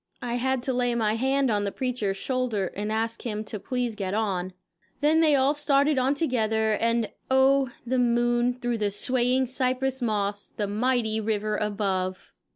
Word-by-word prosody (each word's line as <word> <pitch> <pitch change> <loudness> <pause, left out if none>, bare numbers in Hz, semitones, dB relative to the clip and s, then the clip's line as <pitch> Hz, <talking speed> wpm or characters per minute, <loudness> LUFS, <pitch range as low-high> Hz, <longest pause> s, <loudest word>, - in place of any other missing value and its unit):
I 240 0 -1
had 260 0 0
to 260 - -1
lay 245 -1 0
my 215 -2 +1
hand 265 +2 +1
on 205 -1 +1
the 200 - -2
preacher's 235 -7 -2
shoulder 240 -6 -1
and 210 +2 -3
ask 225 +1 -2
him 215 -3 -3
to 210 -1 -6
please 250 +1 -2
get 200 -2 -3
on; 190 -4 -1 0.5
then 305 +2 +3
they 310 -3 +5
all 275 +1 +3
started 290 -1 +2
on 265 +3 +2
together, 220 -7 +1
and 230 +1 0 0.2
oh, 265 0 +4 0.2
the 255 +1 0
moon, 240 0 +2
through 240 -2 -2
the 210 -1 +1
swaying 250 +5 +1
cypress 260 +1 -1
moss, 205 -3 -1
the 210 - -3
mighty 220 +1 0
river 215 -1 -1
above! 195 -3 -2
240 Hz, 170 wpm, -26 LUFS, 210-260 Hz, 0.5 s, they